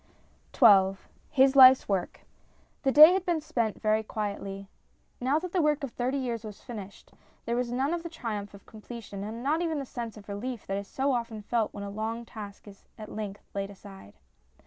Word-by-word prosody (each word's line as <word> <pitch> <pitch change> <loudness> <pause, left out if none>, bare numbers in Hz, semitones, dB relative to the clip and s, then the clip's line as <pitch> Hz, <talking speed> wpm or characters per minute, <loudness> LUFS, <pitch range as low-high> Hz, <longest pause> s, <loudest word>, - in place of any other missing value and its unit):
XII 195 -5 +6 0.3
HIS 270 -2 +4
LIFE'S 260 -1 +8
WORK 195 -3 -2 0.6
THE 270 - +2
day 305 +5 +10
had 380 -1 0
been 345 -3 0
spent 235 -8 -2
very 215 0 +2
quietly. 200 -2 -5 0.5
Now 265 +4 +1
that 350 +2 -4
the 360 - +1
work 300 -1 +1
of 275 - -4
thirty 255 +4 -2
years 240 -4 -3
was 210 -2 -9
finished, 205 -5 -10 0.3
there 235 - -1
was 245 -1 -1
none 265 +6 0
of 345 - -2
the 335 - -7
triumph 215 -10 -5
of 200 - -16
completion 215 -2 -9
and 225 +3 -6
not 305 +5 +1
even 325 -3 -1
the 275 - -4
sense 235 -3 -6
of 205 - -13
relief 220 +4 -5
that 195 - -2
is 200 - -8
so 275 +5 -1
often 230 -3 -3
felt 225 0 0
when 200 - -6
a 200 - -6
long 225 +3 -4
task 205 -2 -10
is 195 -1 -15
at 215 -2 -9
length 205 -2 -6
laid 195 0 -3
aside. 195 - -13
230 Hz, 200 wpm, -28 LUFS, 205-265 Hz, 0.6 s, day